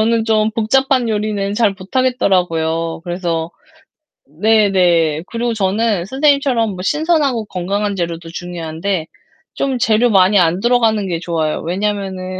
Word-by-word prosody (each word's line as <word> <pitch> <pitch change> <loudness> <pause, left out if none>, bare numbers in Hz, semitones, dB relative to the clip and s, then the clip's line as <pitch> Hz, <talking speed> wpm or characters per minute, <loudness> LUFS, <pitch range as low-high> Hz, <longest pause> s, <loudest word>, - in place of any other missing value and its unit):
저는 225 0 +2
좀 220 -1 +2
복잡한 255 +2 +1
요리는 205 -2 -2
잘 210 -3 +2
못 190 +7 -8
하겠더라고요. 165 -10 0
그래서 175 -2 -3 0.8
네네. 175 -3 +2
그리고 235 0 -2
저는 205 -2 0
선생님처럼 265 -3 +1
뭐 185 - -8
신선하고 295 - +1
건강한 200 +2 -2
재료도 170 -2 -4
중요한데 170 0 -4 0.5
좀 270 -2 -1
재료 225 +1 +2
많이 195 -1 +4
안 175 +1 +2
들어가는 225 -3 +2
게 170 -3 -2
좋아요. 160 -3 -2
왜냐하면은 190 0 -3
200 Hz, 320 characters per minute, -17 LUFS, 175-230 Hz, 0.8 s, 많이